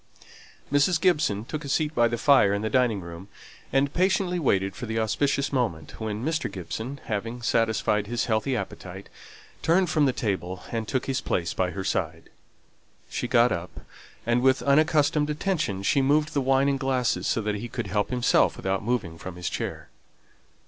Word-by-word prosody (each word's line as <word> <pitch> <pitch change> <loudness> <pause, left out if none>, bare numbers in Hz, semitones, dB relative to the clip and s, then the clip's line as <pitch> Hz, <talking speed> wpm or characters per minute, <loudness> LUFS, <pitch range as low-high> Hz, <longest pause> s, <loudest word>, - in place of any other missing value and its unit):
Mrs. 155 +4 +3
Gibson 150 - +1
took 155 +4 -5
a 140 - -6
seat 150 +2 0
by 120 -5 +4
the 120 0 -2
fire 115 -7 +5
in 100 - -3
the 110 - -2
dining 120 -5 +2
room, 85 +2 -9 0.4
and 135 +2 +2
patiently 185 0 +1
waited 95 - +1
for 125 - -6
the 110 +1 -2
auspicious 140 +6 0
moment 100 - -2
when 110 +2 -3
Mr. 160 +1 -1
Gibson, 110 +9 -6
having 115 +3 -4
satisfied 110 -3 +1
his 120 +1 -1
healthy 115 +4 0
appetite, 95 -2 -6 0.5
turned 175 +1 +2
from 155 -2 +3
the - - +3
table, 95 -6 -3
and 115 -2 -3
took 130 +3 -1
his 130 -1 -1
place 85 -2 -1
by 90 - 0
her 95 +1 -5
side. 100 - -3 0.8
She - - -2
got 120 0 +4
up, 85 -3 -5 0.4
and 120 +1 +2
with 130 0 +3
unaccustomed 150 +1 +3
attention 150 - -1 0.2
moved 150 +3 +2
the 140 - +1
wine 135 +1 +3
and 140 -1 +1
glasses 130 -3 0
so - - +1
that 105 0 -1
he 115 +4 -5
could - - -4
help 105 +1 -1
himself 125 -1 +2
without 95 +1 -2
moving 105 -9 -2
from 95 -1 -7
his 90 -1 -4
chair. - - -5
120 Hz, 175 wpm, -26 LUFS, 100-140 Hz, 0.8 s, fire